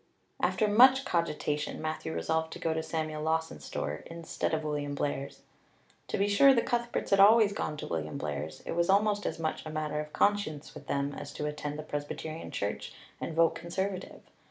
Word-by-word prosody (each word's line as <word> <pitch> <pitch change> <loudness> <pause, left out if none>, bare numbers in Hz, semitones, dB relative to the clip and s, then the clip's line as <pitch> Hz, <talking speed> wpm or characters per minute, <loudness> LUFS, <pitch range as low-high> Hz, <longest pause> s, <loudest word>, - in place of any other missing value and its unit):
After 215 - +2
much 260 +6 +7
cogitation 150 -3 -1
Matthew 155 0 -3
resolved 160 0 -1
to - - -7
go 165 - 0
to 160 - -1
Samuel 155 -1 -3
Lawson's 160 +1 -1
store 75 +1 -3
instead 165 -1 -3
of 160 -1 0
William 145 -1 -2
Blair's. 140 -1 -3 0.6
To - - -2
be 200 - +2
sure, 265 +7 +6
the 235 - +3
Cuthberts 240 -3 -1
always 210 +1 +7
had 200 - -6
gone 150 - -2
to - - -5
William 75 -2 -3
Blair's; 75 +1 -4
it - - -6
was 170 +1 +1
almost 205 +1 +3
as - - -3
much 160 -1 -2
a 155 - -6
matter 155 -1 -2
of 150 0 -5
conscience 205 -8 0
with - - -11
them 140 0 -1
as - - -7
to 150 - -4
attend 150 0 -4
the 155 - -5
Presbyterian 155 +2 -5
church 100 +1 -3 0.3
and 160 - -4
vote 165 0 +4
Conservative. 190 +2 -4
160 Hz, 190 wpm, -30 LUFS, 150-195 Hz, 0.6 s, much